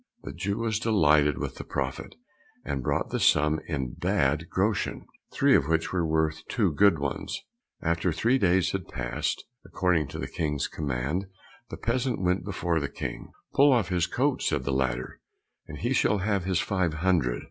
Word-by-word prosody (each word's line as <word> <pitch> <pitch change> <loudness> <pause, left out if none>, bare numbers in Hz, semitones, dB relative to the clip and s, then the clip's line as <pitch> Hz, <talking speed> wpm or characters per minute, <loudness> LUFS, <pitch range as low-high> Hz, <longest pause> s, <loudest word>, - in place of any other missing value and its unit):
The - - -6
Jew 100 +4 -2
was 115 -2 -1
delighted 75 - +3
with - - -4
the - - -6
profit, - - -4 0.5
and 70 -1 -2
brought - - -1
the - - -1
sum 75 +1 +3
in 65 -6 -3
bad 85 -3 0
groschen, 100 +3 -1 0.3
three - - +4
of 65 - +3
which 80 +2 0
were 90 -2 +1
worth 80 0 0
two 100 -9 +1
good 100 +1 +5
ones. 70 -1 -3 0.4
After 85 +2 +1
three 120 +11 +2
days 95 -2 +3
had 95 -3 -4
passed, 60 -1 -3 0.2
according 90 -6 +1
to - - -7
the - - -3
King's 75 -4 -2
command, 75 +6 -2 0.4
the - - -6
peasant 125 +2 -1
went 90 0 +1
before 90 -4 -1
the 70 - -3
King. - - -6 0.2
"Pull 140 -3 +6
his 90 -2 0
coat 135 +1 0
off," - - 0
said 75 -4 0
the 70 - -1
latter, 65 -2 -1 0.5
"and 75 - -8
he 120 - -1
shall 105 -4 +3
have 100 -2 0
his 95 -2 +1
five 95 -5 0
hundred." 80 -8 +1
85 Hz, 180 wpm, -27 LUFS, 75-100 Hz, 0.5 s, Pull